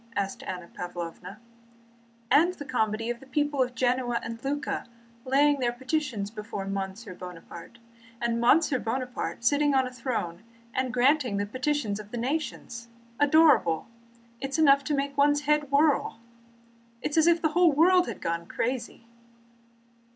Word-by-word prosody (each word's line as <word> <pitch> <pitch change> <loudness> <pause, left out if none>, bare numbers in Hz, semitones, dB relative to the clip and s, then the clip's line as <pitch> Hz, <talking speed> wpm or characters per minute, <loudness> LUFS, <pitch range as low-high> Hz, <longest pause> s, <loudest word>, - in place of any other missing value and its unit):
asked 195 -1 -2
Anna 180 -2 -6
Pávlovna, 175 +3 -7 0.9
"and 330 +4 +6
of - - -19
the 290 - -7
comedy 225 -3 -1
of 240 - -6
the 270 - -15
people 290 +1 0
of 250 -1 -1
Genoa 245 -1 +1
and 230 0 -7
Lucca 285 +2 -3 0.4
laying 285 +2 +3
their 240 -2 +1
petitions 255 -5 -3
before 210 -2 -6
Monsieur 195 +1 -5
Buonaparte, 180 +3 -10 0.4
and 235 0 -1
Monsieur 280 +2 +4
Buonaparte 250 0 -4
sitting 290 +2 +3
on 265 -1 +3
a 255 - -7
throne 235 -9 -3 0.3
and 260 -1 -1
granting 250 -3 +2
the 205 - 0
petitions 255 -2 -2
of 210 -1 -10
the 240 - -6
nations? 240 -3 -4 0.3
Adorable! 290 - +4 0.5
It 270 - -4
is 275 - -2
enough 280 -3 +5
to 295 - 0
make 280 0 -2
one's 290 +1 +3
head 295 0 +1
whirl! 285 -4 +2 0.8
It - - -1
is 295 - -2
as 320 - +4
if 340 0 +5
the 315 - +3
whole 345 +1 +4
world 355 +5 +4
had - - -6
gone 170 0 -3
crazy." 240 -1 -3
255 Hz, 160 wpm, -27 LUFS, 220-290 Hz, 0.9 s, and